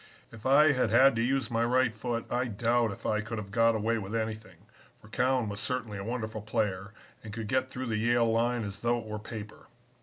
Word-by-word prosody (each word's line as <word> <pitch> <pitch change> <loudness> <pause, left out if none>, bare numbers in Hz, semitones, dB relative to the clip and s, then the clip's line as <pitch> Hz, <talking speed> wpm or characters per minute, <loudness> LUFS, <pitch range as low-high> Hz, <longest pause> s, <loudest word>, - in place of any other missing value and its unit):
If 115 +1 -6
I 145 +3 +6
had 130 -2 +1
had 135 -1 +6
to - - +2
use 130 0 0
my 115 0 +1
right 125 0 +2
foot 115 +1 -3
I 125 +1 +1
doubt 115 0 +1
if 100 - -10
I 110 0 +1
could 110 +1 -5
have 100 -2 -6
got 115 +1 +3
away 110 +2 0
with 100 +2 -5
anything, 110 -4 -4 0.4
for 105 - -17
Cowan 125 0 +1
was 100 0 -5
certainly 115 -4 -3
a - - -5
wonderful 110 -1 -4
player 100 -2 -2 0.3
and 105 - -8
could 110 0 -5
get 130 +2 0
through 130 0 -5
the 110 -3 -1
Yale 120 +2 +3
line 115 +1 +1
as 100 0 -6
though 120 +1 +1
it 115 - -6
were 105 0 -5
paper. 105 -1 -9
115 Hz, 230 wpm, -29 LUFS, 105-120 Hz, 0.4 s, I